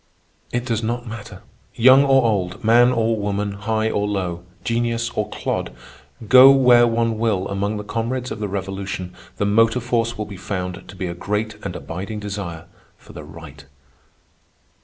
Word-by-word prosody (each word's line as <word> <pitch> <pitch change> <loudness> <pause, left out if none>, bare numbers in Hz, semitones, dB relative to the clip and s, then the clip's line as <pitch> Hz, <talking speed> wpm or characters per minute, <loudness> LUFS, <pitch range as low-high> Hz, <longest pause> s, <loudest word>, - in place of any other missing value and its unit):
It 120 0 -2
does 115 -3 -1
not 120 +2 -3
matter, 110 -2 -9 0.3
young 130 +4 +7
or 135 -1 +4
old, 100 -2 -1
man 120 +3 +5
or 115 -2 +1
woman, 100 0 -2
high 110 +2 -1
or 105 0 -1
low, 90 -4 -3 0.2
genius 115 0 -1
or - - -2
clod, - - -3 0.6
go 130 +3 +9
where 125 -3 +6
one 115 -1 0
will 105 -5 0
among 100 +2 -2
the 105 - -5
comrades 120 +4 -3
of 105 - -5
the 105 - -2
Revolution, 95 -2 -5 0.2
the 100 - 0
motor 115 +4 +3
force 120 -1 -1
will 105 - -3
be 100 -2 -9
found 90 -1 -5
to - - -11
be 95 - -4
a 85 - -3
great 105 +4 -4
and - - -5
abiding 100 +5 -6
desire 100 -6 -6 0.3
for - - -16
the - - -9
right. 70 0 -12
110 Hz, 170 wpm, -21 LUFS, 100-115 Hz, 0.6 s, go